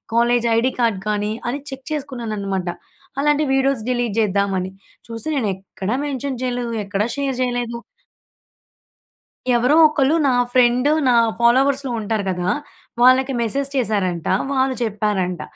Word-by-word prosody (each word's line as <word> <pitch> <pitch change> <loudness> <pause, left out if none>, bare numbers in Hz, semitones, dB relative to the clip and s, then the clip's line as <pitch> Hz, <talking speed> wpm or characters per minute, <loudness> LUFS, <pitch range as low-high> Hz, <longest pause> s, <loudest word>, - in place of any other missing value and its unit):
College 240 0 +3
ID 255 +3 +2
card 225 -5 +1
కానీ, 210 0 -1 0.2
అని 280 +3 -3
check 270 0 -9
చేసుకున్నాను 255 -7 -4
అనమాట. 195 -2 -3 0.5
అలాంటి 295 +1 +2
వీడియోస్ 270 -3 +1
డిలీట్ 240 -4 -1
చేద్దామని. 195 -2 0 0.4
చూస్తే 230 +7 -4
నేను 220 -6 0
ఎక్కడా 195 +3 -5
మెన్షన్ 270 -2 -3
చేయలేదు, 245 -1 -2
ఎక్కడా 200 +2 -1
షేర్ 275 -2 -1
చేయలేదు. 245 -2 -2 1.8
ఎవరో 250 +5 +3
ఒకళ్ళు 300 0 +1
నా 255 - +3 0.2
ఫ్రెండ్, 250 +2 +3 0.2
నా 250 - +4 0.3
ఫాలోవర్స్‌లో 265 +3 +3
ఉంటారు 215 0 -2
కదా! 180 0 -1 0.5
వాళ్ళకి 260 +2 +5
మెసేజ్ 270 +5 -1
చేశారంట, 195 -9 -1 0.2
వాళ్ళు 265 -1 +1
చెప్పారంట. 205 -4 -1
240 Hz, 125 wpm, -20 LUFS, 210-265 Hz, 1.8 s, వాళ్ళకి